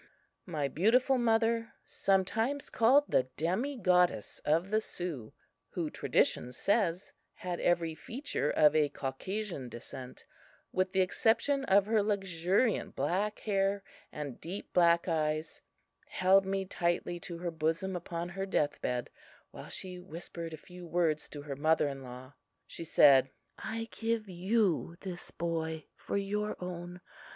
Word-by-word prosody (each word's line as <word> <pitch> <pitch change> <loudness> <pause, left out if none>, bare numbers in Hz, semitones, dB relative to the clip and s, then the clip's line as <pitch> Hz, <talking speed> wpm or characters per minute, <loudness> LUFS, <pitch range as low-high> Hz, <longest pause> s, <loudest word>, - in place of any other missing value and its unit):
My 145 -3 -1
beautiful 245 - +3
mother, 230 0 +1
sometimes 220 +8 0
called 260 +6 +5
the 130 - +2
"Demi 210 - -1
Goddess" 180 - +2
of 165 +6 +1
the 215 0 +3
Sioux, 165 - -6 0.4
who - - -3
tradition 125 - +1
says 185 - 0 0.2
had 180 -1 -4
every 170 -2 +1
feature 230 - -3
of 150 0 +5
a 150 -2 +4
Caucasian 160 - -4
descent 125 +2 -10 0.5
with 185 0 0
the 190 - +3
exception 260 +8 +2
of 195 -2 +5
her 215 0 +3
luxuriant 195 +1 +1
black 190 +9 -1
hair 195 -1 +1 0.3
and 145 -4 -6
deep 185 +5 -6
black 170 -1 +4
eyes, 155 -1 -1 0.5
held 190 +1 +4
me 195 0 -1
tightly 175 -1 -1
to 170 0 -7
her 175 0 -3
bosom 165 +4 -1
upon 170 0 -4
her 195 +2 -4
death 150 -6 0
bed, 125 -1 -2 0.4
while - - -10
she 180 -1 -4
whispered 170 -1 -7
a 160 - -6
few 180 +2 -11
words 165 -3 0
to 145 -1 -8
her 145 -2 -5
mother 155 +2 +3
in 135 -1 -5
law. 130 +1 -10 0.3
She 165 - -7
said: 135 -4 +6 0.3
"I 225 +1 -4
give 225 -1 -1
you 185 -2 +1
this 180 -2 -5
boy 160 -2 -3
for - - -3
your 210 +1 -1
own. 180 0 -6
180 Hz, 140 wpm, -32 LUFS, 160-200 Hz, 0.5 s, said